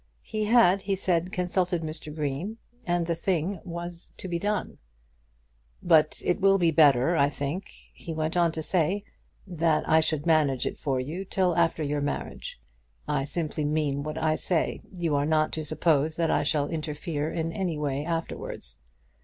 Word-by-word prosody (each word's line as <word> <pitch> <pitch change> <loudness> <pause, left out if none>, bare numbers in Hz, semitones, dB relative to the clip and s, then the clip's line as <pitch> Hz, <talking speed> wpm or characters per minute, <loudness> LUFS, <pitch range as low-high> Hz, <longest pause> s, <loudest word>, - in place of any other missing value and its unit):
He 215 -1 -2
had, 210 -4 +5
he 195 0 0
said, 180 -2 0
consulted 180 -1 0
Mr. 155 -1 -5
Green, 150 +8 -3 0.3
and 175 -1 +1
the 170 - 0
thing 180 +2 -1
was 170 -1 -6
to - - -7
be 170 -1 -2
done. 205 +3 -2 1.0
"But 155 -3 +4
it 180 +3 +1
will 195 0 +5
be 170 -3 +3
better, 145 0 +5
I 140 -2 +4
think," 145 +6 -4 0.2
he 170 - -8
went 155 +1 -2
on 170 -2 +3
to 160 - -4
say, 185 +4 +1 0.4
"that 165 -4 +1
I 160 - +5
should 155 -2 0
manage 150 -6 +3
it - - -3
for 135 -3 0
you 155 +9 -4
till 185 -2 +1
after 165 -2 +2
your 145 0 -1
marriage. 140 - -4 0.5
I 145 -2 0
simply 155 0 -2
mean 145 -2 0
what 155 +2 -4
I 155 -1 +1
say. 175 -4 0
You 170 -5 -1
are 145 0 +2
not 155 -1 +2
to 160 - -3
suppose 155 0 +1
that 165 -1 +1
I - - +3
shall 145 -2 +1
interfere 155 -1 -3
in 165 0 -2
any 180 -4 -2
way 145 -1 -1
afterwards. 165 - -4
160 Hz, 175 wpm, -27 LUFS, 150-175 Hz, 1.0 s, had